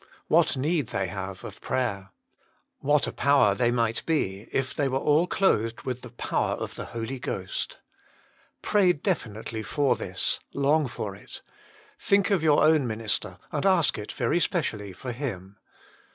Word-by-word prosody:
What 130 - +4
need 150 0 0
they 95 -3 -2
have 95 0 -6
of - - -9
prayer. 100 -7 -2 0.7
What 145 +1 +2
a - - -3
power 140 -8 +4
they 120 +3 +2
might 115 -1 0
be, 105 - -1
if 135 0 -1
they 145 - 0
were 135 0 0
all 150 +5 +3
clothed 115 - +1
with 125 -1 -4
the 125 - -9
power 120 - -1
of - - -5
the - - -6
Holy 120 +3 -5
Ghost. 95 -5 -4 0.9
Pray 195 -4 +4
definitely 115 - -3
for 140 +5 +1
this; - - 0 0.2
long 145 +1 +3
for 105 -5 -5
it. - - -11 0.6
Think 200 +1 +2
of 195 -5 +3
your 155 -2 +4
own 155 -4 +4
minister, 110 -4 -2
and 145 - -2
ask 185 - +3
it 105 - -6
very 175 - +1
specially 110 - -1
for 125 +8 -6
him. 105 -7 -5
125 Hz, 160 wpm, -27 LUFS, 105-150 Hz, 0.9 s, What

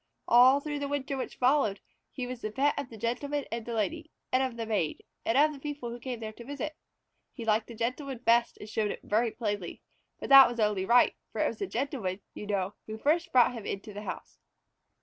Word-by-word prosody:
All 255 +3 +7
through 295 0 -4
the 285 - -2
winter 280 -1 -2
which 265 - -5
followed, 250 -6 +2 0.3
he 255 - -4
was 250 -1 -6
the 215 - -3
pet 280 +5 +2
of 280 -3 -4
the 225 - -10
Gentleman 265 +6 -2
and 230 0 -4
the 235 - -3
Lady, 315 +9 -2 0.2
of 255 -2 +1
the 230 - -3
Maid, 205 -9 -1 0.2
and 225 - +3
of 300 +2 +5
the 280 - -10
people 285 -4 -5
who 240 - -7
came 245 -1 -5
there 220 -1 -5
to 235 - -12
visit. 285 +4 -5 0.6
He 230 - -6
liked 220 0 +2
the 235 - -9
Gentleman 255 +4 -3
best 235 0 +2
and 210 - -9
showed 215 -1 -1
it - - -5
very 225 +3 +1
plainly, 205 -5 -4 0.4
but - - -6
that 275 -2 +10
was 240 -1 -6
only 210 -3 +1
right, 240 +4 +5 0.2
for - - -2
it - - +3
was - - -5
the 400 - -2
Gentleman, 235 - -2
you 210 - -8
know, 200 -1 -1
who 220 0 -5
first 330 +8 +1
brought 250 -2 +5
him 225 -4 -7
into 205 +2 -5
the 205 - -6
house. - - -7
240 Hz, 230 wpm, -29 LUFS, 220-280 Hz, 0.6 s, that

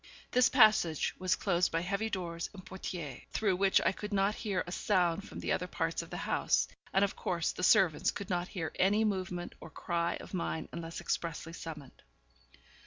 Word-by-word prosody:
This 250 +1 +5
passage 215 - +4
was 185 0 +2
closed 180 -2 +1
by 165 - 0
heavy 200 +5 -1
doors 170 -4 -3
and 190 - -10
portières, 170 -7 -6
through 195 -4 +1
which 195 0 +4
I - - +5
could 210 +2 -7
not 200 +1 +2
hear 205 -4 -2
a 175 - -7
sound 185 -1 +1
from - - -7
the - - -2
other - - 0
parts - - -1
of - - -11
the - - -5
house, - - +2 0.2
and, 195 +1 +4
of 200 - -5
course, 170 -2 -1
the - - -7
servants 180 -4 +4
could 200 - -4
not 180 -1 -1
hear 165 -5 -4
any 205 +4 +4
movement 185 -3 -2
or 165 - -10
cry 170 +1 -1
of - - -10
mine 170 -3 -2
unless 165 0 -5
expressly 165 0 -3
summoned. 155 -5 -9
180 Hz, 190 wpm, -32 LUFS, 170-200 Hz, 0.2 s, This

